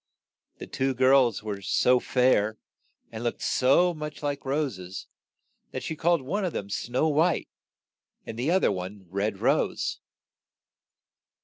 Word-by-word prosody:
The -, -, -7 dB
two 135 Hz, 0 st, -1 dB
girls 130 Hz, -4 st, +4 dB
were 105 Hz, -2 st, -4 dB
so 125 Hz, +6 st, +3 dB
fair, 115 Hz, -5 st, +2 dB, 0.5 s
and 115 Hz, 0 st, -6 dB
looked 120 Hz, -, -3 dB
so 175 Hz, +8 st, +3 dB
much 150 Hz, -2 st, -7 dB
like 145 Hz, -1 st, -2 dB
ro 145 Hz, +3 st, +1 dB
ses, 95 Hz, -5 st, -8 dB, 0.7 s
that -, -, -4 dB
she 160 Hz, -, -4 dB
called 170 Hz, -1 st, +2 dB
one 195 Hz, +10 st, -2 dB
of 180 Hz, -, -2 dB
them 100 Hz, 0 st, -5 dB
Snow 125 Hz, +8 st, 0 dB
White, 160 Hz, +2 st, +1 dB, 0.8 s
and -, -, -6 dB
the 125 Hz, +6 st, -1 dB
oth 190 Hz, +1 st, +2 dB
er 90 Hz, 0 st, 0 dB, 0.2 s
Red 100 Hz, +4 st, -1 dB
Rose. -, -, 0 dB
130 Hz, 140 wpm, -27 LUFS, 110-150 Hz, 0.8 s, girls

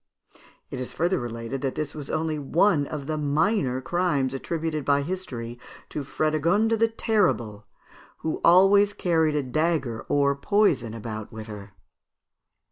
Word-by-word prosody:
It 130 Hz, -, -4 dB
is 125 Hz, -, -5 dB
further 175 Hz, +3 st, +1 dB
related 115 Hz, +2 st, -5 dB
that 135 Hz, -2 st, -2 dB
this 150 Hz, -2 st, -3 dB
was 145 Hz, -3 st, -7 dB
only 155 Hz, -1 st, -1 dB
one 150 Hz, +1 st, +2 dB
of 150 Hz, -3 st, -5 dB
the 155 Hz, +1 st, -2 dB
minor 145 Hz, -, +1 dB
crimes 145 Hz, -4 st, 0 dB
attributed 155 Hz, +2 st, -3 dB
by 140 Hz, +1 st, +2 dB
history 125 Hz, -9 st, -5 dB, 0.3 s
to 150 Hz, -, -4 dB
Frédégonde 165 Hz, +10 st, +1 dB
the 230 Hz, -, +4 dB
Terrible, 175 Hz, -, 0 dB, 0.6 s
who 160 Hz, -, -2 dB
always 195 Hz, +4 st, +6 dB
carried 160 Hz, -6 st, +1 dB
a 145 Hz, -, +1 dB
dagger 140 Hz, -4 st, -1 dB
or 140 Hz, -1 st, +3 dB
poison 140 Hz, -, +1 dB
about 110 Hz, -1 st, -6 dB
with 110 Hz, -1 st, -8 dB
her. 105 Hz, -2 st, -10 dB
150 Hz, 140 wpm, -25 LUFS, 125-175 Hz, 0.6 s, always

